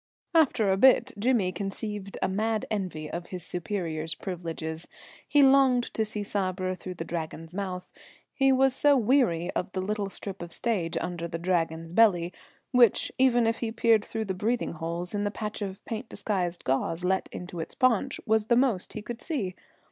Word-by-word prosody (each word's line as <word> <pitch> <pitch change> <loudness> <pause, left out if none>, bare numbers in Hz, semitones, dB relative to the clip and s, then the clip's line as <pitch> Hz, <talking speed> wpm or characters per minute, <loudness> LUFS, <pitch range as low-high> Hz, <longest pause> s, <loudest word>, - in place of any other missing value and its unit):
After 260 - +4
a 190 - +2
bit 260 +2 +5
Jimmy 220 -5 +2
conceived 200 +2 -4
a - - +3
mad 215 +3 0
envy 180 -7 -3
of 170 +3 -5
his 180 -2 -6
superior's 165 -4 -3
privileges; 165 -3 -4 0.4
he 290 -1 +5
longed 265 -2 +4
to 220 - +1
see 210 -1 -3
Sabra 185 -2 -1
through 185 0 -7
the 165 - -5
Dragon's 165 0 -5
mouth. 185 -2 -4 0.4
He 270 -1 +3
was 265 0 +4
so 290 0 +5
weary 220 -9 +2
of 180 - -3
the 190 - -2
little 200 +1 -2
strip 195 -1 -7
of 170 0 -7
stage 185 -8 -1
under 170 -1 -3
the 165 - -4
Dragon's 165 -1 -1
belly, 180 -5 +4 0.4
which, 245 -5 +4
even 245 -3 +4
if 225 0 +1
he 230 -2 -2
peered 225 -2 +3
through 220 0 -4
the 190 - -2
breathing 225 +6 -1
holes 170 +3 -3
in 205 0 -1
the 205 - +1
patch 210 0 -5
of 195 -1 -5
paint 225 +2 -5
disguised 180 -4 -2
gauze 165 +6 0
let 190 +1 0
into 175 -1 -7
its 160 - -6
paunch, 255 +1 +2
was 220 -2 +2
the 235 - +3
most 240 -7 +1
he 215 - -6
could 235 +1 -6
see. 235 - -2
195 Hz, 185 wpm, -28 LUFS, 175-230 Hz, 0.4 s, bit